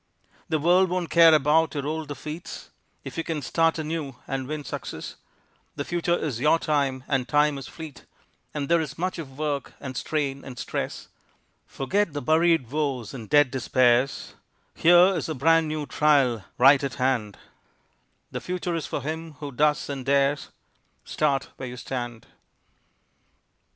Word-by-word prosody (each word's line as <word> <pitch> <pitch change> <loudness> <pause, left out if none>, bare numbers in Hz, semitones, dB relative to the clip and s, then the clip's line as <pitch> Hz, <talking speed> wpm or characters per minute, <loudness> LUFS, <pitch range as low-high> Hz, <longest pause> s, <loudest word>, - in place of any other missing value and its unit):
The 160 - +2
world 175 +4 +4
won't 175 -2 -2
care 165 0 +8
about 155 +2 +3
your 140 -1 -2
old 155 +1 -3
defeats 150 +4 -8 0.3
If - - -6
you - - -1
can 155 -3 -3
start 165 +5 +2
anew 155 -4 -4
and 135 -1 -3
win 150 0 -4
success, - - -6 0.6
The 140 - -4
future 175 0 0
is 135 -8 -3
your 150 +5 +4
time, 140 -5 0
and 130 -3 0
time 150 0 +3
is 135 - -9
fleet 160 -5 -10 0.5
And 145 -2 -3
there 170 +1 +3
is 150 -1 -6
much 180 +1 -2
of 135 -4 -9
work 145 -3 -2
and 130 -2 -7
strain 140 -1 -2
and 125 -2 -9
stress; - - -4 0.6
Forget 190 +5 -1
the 145 - -3
buried 160 -4 +3
woes 140 -6 -2
and 115 -5 -8
dead 145 -3 +5
despairs, 130 0 +2 0.4
Here 175 +3 +6
is - - -3
a 160 - -2
brand 165 +4 +3
new 155 -1 -3
trial 135 -9 +2
right 135 +3 +6
at 135 -4 -3
hand, 125 -6 0 0.9
The - - -4
future 180 -1 -3
is 165 -2 -3
for 140 - -4
him 160 +2 -5
who 145 -1 -7
does 150 +3 +1
and 140 -2 -5
dares, 140 +1 +1 0.6
Start 140 -3 0
where 130 - -6
you 125 - -8
stand. 120 -3 -5
150 Hz, 160 wpm, -25 LUFS, 135-160 Hz, 0.9 s, care